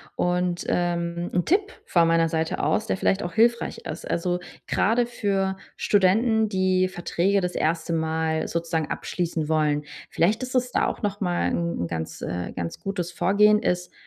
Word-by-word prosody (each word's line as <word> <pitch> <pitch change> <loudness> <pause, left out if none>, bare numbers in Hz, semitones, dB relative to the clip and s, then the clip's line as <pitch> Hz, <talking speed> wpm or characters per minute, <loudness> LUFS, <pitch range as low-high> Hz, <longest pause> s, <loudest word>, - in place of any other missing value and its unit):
Und, 180 0 0
ähm, 170 0 -1
'n 180 - +2
Tipp 405 +5 +2
von 170 -2 +3
meiner 165 0 +3
Seite 160 0 -1
aus, 155 +9 +1
der 225 - -1
vielleicht 195 0 +1
auch 175 - -4
hilfreich 235 +4 +2
ist, - - -7
also, 175 +1 0 0.3
gerade 235 +3 +2
für 195 -4 -1 0.2
Studenten, 220 +3 +3
die 185 -1 +2
Verträge 185 +2 0
das 180 -1 -3
1. 165 +1 0
Mal 160 0 0
sozusagen 165 -2 -2
abschließen 165 -3 -2
wollen: 150 -2 +1 0.3
Vielleicht 210 +9 +2
ist 255 0 -5
es 250 -1 +1
da - - +2
auch - - -4
noch 205 -2 -2
mal 175 -3 0
'n 170 - -2
'n 85 - -1
ganz, 80 -1 -5
äh, 90 0 -4
ganz 85 -2 -4
gutes 180 -3 -3
Vorgehen 205 +5 +4
ist: 180 -3 -1
175 Hz, 170 wpm, -25 LUFS, 165-200 Hz, 0.3 s, Vorgehen